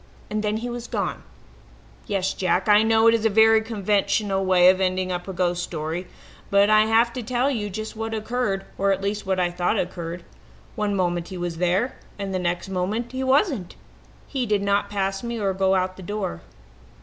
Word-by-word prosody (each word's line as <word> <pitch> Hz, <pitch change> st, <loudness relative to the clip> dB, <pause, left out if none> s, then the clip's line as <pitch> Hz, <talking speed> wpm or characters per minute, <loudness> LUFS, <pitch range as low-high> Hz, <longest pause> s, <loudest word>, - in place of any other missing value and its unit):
"And 215 Hz, 0 st, -1 dB
then 210 Hz, 0 st, -1 dB
he 235 Hz, +2 st, -4 dB
was 240 Hz, 0 st, -5 dB
gone -, -, -3 dB, 0.9 s
yes, 195 Hz, -3 st, 0 dB
Jack, 185 Hz, +1 st, 0 dB
I 210 Hz, 0 st, +6 dB
know 220 Hz, 0 st, +3 dB
it 230 Hz, -, +7 dB
is 230 Hz, -2 st, +1 dB
a 225 Hz, -, +4 dB
very 220 Hz, +1 st, +5 dB
conventional 200 Hz, -2 st, 0 dB
way 185 Hz, -1 st, +5 dB
of 185 Hz, +1 st, +3 dB
ending 185 Hz, 0 st, 0 dB
up 180 Hz, 0 st, -4 dB
a -, -, -3 dB
ghost 175 Hz, -1 st, 0 dB
story,| 165 Hz, +1 st, -4 dB, 0.4 s
but 200 Hz, +1 st, +4 dB
I 215 Hz, 0 st, +5 dB
have 230 Hz, +2 st, +3 dB
to 250 Hz, -, -4 dB
tell 250 Hz, +4 st, 0 dB
you 210 Hz, -5 st, -2 dB
just 215 Hz, +3 st, -6 dB
what 225 Hz, 0 st, -3 dB
occurred, 215 Hz, -3 st, -2 dB
or 195 Hz, 0 st, +3 dB
at 195 Hz, 0 st, -1 dB
least 205 Hz, 0 st, -2 dB
what 190 Hz, -1 st, +1 dB
I 175 Hz, -1 st, +1 dB
thought 180 Hz, +4 st, 0 dB
occurred. 175 Hz, -2 st, -4 dB, 0.5 s
One 210 Hz, -1 st, -1 dB
moment 175 Hz, -2 st, 0 dB
he 185 Hz, -, -7 dB
was 175 Hz, -1 st, -4 dB
there 180 Hz, +9 st, 0 dB, 0.2 s
and 200 Hz, -1 st, -4 dB
the 185 Hz, -, 0 dB
next 175 Hz, +1 st, -2 dB
moment 195 Hz, +6 st, -2 dB
he 260 Hz, 0 st, -3 dB
wasn't. 265 Hz, -, +1 dB, 0.5 s
He 260 Hz, -3 st, -3 dB
did 205 Hz, -1 st, +1 dB
not 200 Hz, 0 st, +1 dB
pass 195 Hz, -1 st, -1 dB
me 235 Hz, -1 st, -4 dB
or 195 Hz, -2 st, 0 dB
go 190 Hz, 0 st, +2 dB
out 185 Hz, 0 st, +1 dB
of -, -, -21 dB
the -, -, -9 dB
door. 195 Hz, -, -4 dB
200 Hz, 210 wpm, -24 LUFS, 185-220 Hz, 0.9 s, it